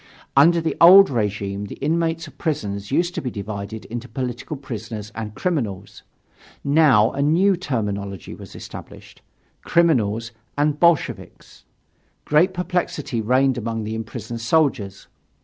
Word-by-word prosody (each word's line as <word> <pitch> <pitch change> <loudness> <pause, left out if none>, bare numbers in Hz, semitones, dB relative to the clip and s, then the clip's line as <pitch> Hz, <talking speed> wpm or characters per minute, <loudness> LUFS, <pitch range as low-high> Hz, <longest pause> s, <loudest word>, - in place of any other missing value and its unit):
Under 170 +5 +6
the 160 - -2
old 190 +1 +9
regime 105 -3 -2
the - - -8
inmates 165 +1 -1
of 145 -1 -16
prisons 100 - -3
used 175 +5 +1
to - - -3
be 130 - -3
divided 105 0 -6
into 120 +2 -6
political 125 +2 -4
prisoners 115 -5 -7
and 110 -1 -6
criminals. 110 - -3 0.6
Now 140 -7 +4
a 140 - -3
new 175 +7 +3
terminology 105 - -4
was - - -12
established: - - -11 0.4
Criminals 115 -10 +2 0.3
and 145 0 +1
Bolsheviks. 170 -4 0 0.6
Great 155 +6 +3
perplexity 175 -8 -2
reigned 130 +3 +2
among 115 -1 -3
the 110 +1 -4
imprisoned 115 +1 -6
soldiers. 115 -8 0
125 Hz, 130 wpm, -22 LUFS, 105-160 Hz, 0.6 s, old